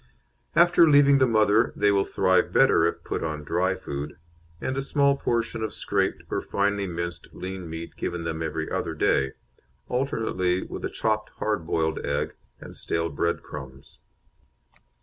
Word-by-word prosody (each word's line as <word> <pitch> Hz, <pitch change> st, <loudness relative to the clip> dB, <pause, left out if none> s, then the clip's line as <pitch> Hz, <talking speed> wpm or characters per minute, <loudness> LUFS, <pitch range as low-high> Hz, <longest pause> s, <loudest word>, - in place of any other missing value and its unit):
After 170 Hz, -1 st, +6 dB
leaving 140 Hz, -1 st, +6 dB
the 130 Hz, -, +5 dB
mother 110 Hz, 0 st, +3 dB
they 105 Hz, -, +3 dB
will 100 Hz, -1 st, +2 dB
thrive -, -, +2 dB
better 80 Hz, -, +5 dB
if -, -, -4 dB
put -, -, -3 dB
on 75 Hz, -2 st, -3 dB
dry 90 Hz, +5 st, 0 dB
food, 70 Hz, -3 st, -6 dB, 0.4 s
and 130 Hz, -, -2 dB
a 135 Hz, -, -1 dB
small 140 Hz, 0 st, +2 dB
portion 115 Hz, -3 st, -1 dB
of 110 Hz, -, -3 dB
scraped -, -, -1 dB
or -, -, 0 dB
finely 100 Hz, 0 st, 0 dB
minced 85 Hz, 0 st, -5 dB
lean 95 Hz, -2 st, -6 dB
meat 80 Hz, +1 st, -7 dB
given 85 Hz, -1 st, -3 dB
them 80 Hz, -1 st, -3 dB
every 80 Hz, -2 st, -3 dB
other 80 Hz, -, -2 dB
day, 70 Hz, -3 st, +2 dB, 0.6 s
alternately 110 Hz, -8 st, 0 dB
with -, -, -7 dB
a -, -, -1 dB
chopped 110 Hz, -1 st, -1 dB
hard 105 Hz, -7 st, -1 dB
boiled 80 Hz, -1 st, 0 dB
egg 70 Hz, +1 st, -1 dB, 0.3 s
and -, -, -11 dB
stale 85 Hz, 0 st, -2 dB
bread 85 Hz, +3 st, -1 dB
crumbs. 65 Hz, -2 st, -10 dB
90 Hz, 160 wpm, -26 LUFS, 80-110 Hz, 0.6 s, After